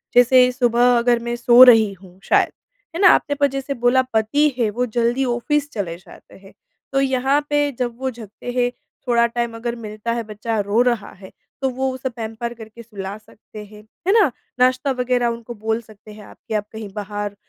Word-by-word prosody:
जैसे 250 +1 +6
सुबह 245 -1 +3
अगर 240 0 +2
मैं 240 0 -3
सो 240 +1 +5
रही 225 -5 +7
हूँ 185 -1 -17
शायद। - - +2 0.4
है 350 - -2
ना? 370 - +8
आपने 285 0 +2
जैसे 275 +1 -4
बोला 245 +1 +2
पति 285 +8 +2
है, 225 -3 +2
वो 245 +4 -1
जल्दी 240 +3 0
ऑफ़िस 280 +5 -1
चले 175 -6 -4
जाते 185 - -17
हैं। 195 0 -17 0.4
तो 270 - +2
यहाँ 265 +1 +1
पे 290 -1 +1
जब 240 -2 -2
वो 265 0 -1
जगते 225 +1 -9
हैं, 245 0 0 0.4
थोड़ा 235 -1 +3
टाइम 235 0 -3
अगर 235 +1 -4
मिलता 215 0 -5
है, 235 -1 -3
बच्चा 215 +1 -4
रो 205 +4 +1
रहा 240 -4 0
है, 190 - -12 0.3
तो 265 - +1
वो 265 +1 -2
उसे 260 0 -4
पैंपर 230 0 -6
करके 225 0 -12
सुला 200 -2 -7
सकते 215 0 -13
हैं। 210 +1 -15 0.2
है 390 - +4
ना? 360 - +3 0.3
नाश्ता 255 +2 +2
वग़ैरह 250 -1 0
उनको 235 0 -5
बोल 220 +2 -2
सकते 215 -1 -16
हैं 210 0 -13
आप - - -16
कि 225 - -5
आप 210 -1 -1
कहीं 220 -2 -7
बाहर 205 0 -5
235 Hz, 200 wpm, -20 LUFS, 215-250 Hz, 0.4 s, ना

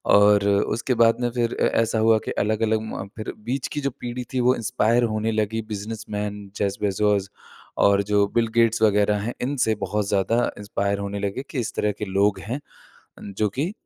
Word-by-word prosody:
और 100 0 +5
उसके 110 +5 +1
बाद 115 +1 +5
में 120 - +1
फिर 120 -1 -1
अ, - - +3 0.2
ऐसा 110 0 0
हुआ 110 0 +5
कि - - -3
अलग-अलग 110 +1 +1
म 100 -2 -6
फिर 110 - -4
बीच 130 +3 -2
की 150 - -2
जो 140 - 0
पीढ़ी 120 +1 -4
थी 130 - 0
वो 130 - +5
इंस्पायर 120 0 +1
होने 110 +1 0
लगी 110 +1 -1
बिज़नसमैन 105 -1 -4 0.2
जेफ 100 -1 0
बेज़ोस 100 -1 +1 0.6
और 100 0 +4
जो 100 0 +2
बिल 115 -1 +3
गेट्स 115 -1 +3
वग़ैरह 105 -1 +3
हैं। 120 +3 -3
इनसे 125 -4 +1
बहुत 105 -1 -1
ज़्यादा 110 +4 +1
इंस्पायर 100 -1 -2
होने 100 0 -4
लगे 100 +6 -3
कि 135 - -3
इस 115 - -3
तरह 105 - +1
के 105 - -2
लोग 100 +1 +1
हैं 120 +8 -4 0.8
जो 105 0 +2
कि 145 - -2
110 Hz, 190 wpm, -23 LUFS, 100-115 Hz, 0.8 s, और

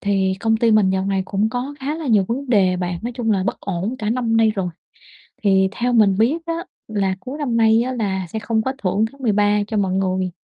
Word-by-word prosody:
Thì 195 -2 +1
công 225 -1 +2
ty 230 0 +2
mình 210 -3 +4
dạo 190 0 0
này 195 -1 0
cũng 205 +3 0
có 255 +4 -4
khá 285 +3 -2
là 320 -3 -6
nhiều 210 -5 +4
vấn 260 +3 -3
đề 190 -5 +3
bạn, 180 -1 -3
nói 240 - -4
chung 235 -2 -2
là 195 -3 +2
bất - - -2
ổn 195 +6 -3
cả 215 -1 -2
năm 230 -2 0
nay 225 -1 +4
rồi. 190 -3 -2 0.8
Thì 190 -1 +4
theo 245 +2 -1
mình 210 -4 +4
biết 235 +9 +3
á 335 - -2 0.4
là 195 -2 0
cuối 260 +7 -7
năm 255 -6 -1
nay 225 0 +4
á 255 +2 -2
là 190 -5 -2
sẽ 220 - -4
không 220 0 0
có 265 +3 -2
thưởng 200 +3 +1
tháng 275 - -17
13 210 -3 +2
cho 215 - -2
mọi 190 -2 +1
người. 185 -1 0
215 Hz, 245 wpm, -20 LUFS, 190-235 Hz, 0.8 s, mình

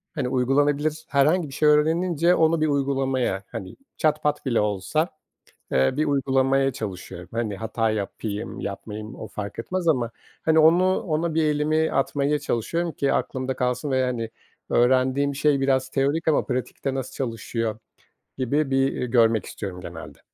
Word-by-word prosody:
hani, 130 -4 -1
uygulanabilir 145 +4 +1
herhangi 150 +4 +3
bir - - -10
şey 150 +1 +3
öğrenince 165 +3 +3
onu 160 0 +3
bir 155 - +3
uygulamaya, 135 -7 0
hani, 95 - -7 0.2
çat 155 -1 +1
pat 150 -1 0
bile 120 -3 +2
olsa, 105 - 0 0.6
eee, 65 - +3
bir 155 - +2
uygulamaya 135 -1 +2
çalışıyorum. 90 -5 -7
Hani, 110 -3 -2
hata 110 +1 -1
yapayım, 105 0 -4
yapmayayım 105 +3 -6
o 110 - -7
fark 100 +1 -6
etmez 180 +8 -3
ama, 125 -7 +2 0.3
hani, 160 0 +3
onu 180 +4 +5
ona 160 0 -1
bir 160 0 +2
elimi 155 +1 +1
atmaya 145 +2 +1
çalışıyorum 165 +9 -1
ki 140 -3 0
aklımda 130 0 -2
kalsın 125 +3 -1
ve, 130 0 +2
hani, 115 -3 -2 0.4
öğrendiğim 130 +3 +2
şey 140 0 +2
biraz 130 -1 +1
teorik 140 +5 0
ama 155 - +3
pratikte 130 +1 -3
nasıl 130 -1 -4
çalışıyor 115 -3 -3 0.6
gibi 135 +2 0
bir, 135 0 +3
eee, 125 - -2
görmek 115 -3 +3
istiyorum 90 -3 -6
genelde. 85 -2 -9
135 Hz, 155 wpm, -24 LUFS, 115-150 Hz, 0.6 s, onu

